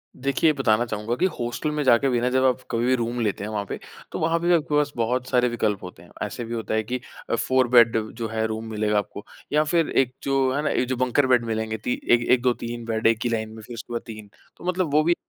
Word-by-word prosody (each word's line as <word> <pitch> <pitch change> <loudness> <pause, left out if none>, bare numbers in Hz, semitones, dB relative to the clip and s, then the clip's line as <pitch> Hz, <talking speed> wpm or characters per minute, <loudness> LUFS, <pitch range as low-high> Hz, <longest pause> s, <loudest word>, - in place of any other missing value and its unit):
देखिए, 140 +4 +2
बताना 120 -4 +2
चाहूँगा 110 +1 -3
कि 180 - +1
हॉस्टल 120 +6 -2
में 150 0 -1
जाके 130 +1 +4
भी 120 - +1
ना 125 - +1
जब 130 +1 +2
आप 130 0 +2
कभी 115 +1 0
भी 130 - +3
रूम 120 0 -2
लेते 105 -3 -1
हैं 105 - -4
वहाँ 105 -1 -2
पे, - - -6 0.3
तो - - -4
वहाँ 165 +1 +1
पे 175 +1 +2
आपके 150 -2 0
पास 150 -1 +2
बहुत 125 +2 0
सारे 125 -1 +3
विकल्प 105 -4 -1
होते 90 -2 -10
हैं। 90 - -18
ऐसे 115 +3 -5
भी 115 - -6
होता 115 -1 -3
है 110 - +1
कि 125 +4 -3 0.3
अ, - - +2
4 130 +1 +2
बेड 115 -2 +6 0.2
जो 115 0 -4
है 110 0 -1
रूम 110 +1 -4
मिलेगा 105 -1 0
आपको 105 0 -4 0.3
या 150 +1 +4
फिर 165 +1 +1
एक 130 -2 +2
जो 135 -1 +1
है 145 - 0
ना, - - +1
एक 125 - 0
जो 130 - -1
बंकर 130 +2 +2
बेड 125 -2 +3
मिलेंगे 110 -1 -2
ती 120 +3 -2 0.2
एक 120 0 +5
1, 125 -1 +5
2,, 125 0 +3
3 120 0 -6
बेड 110 0 +1
एक 115 -1 +3
ही 120 - 0
लाइन 110 -1 -2
में, 110 0 -10
फिर 120 +3 -10
उसके 120 +1 -8
बाद 115 - -2
3, 110 -2 -9 0.3
तो - - -14
मतलब 180 -4 0
वो 155 +1 +5
भी 170 +2 +3
120 Hz, 275 wpm, -24 LUFS, 110-130 Hz, 0.3 s, बेड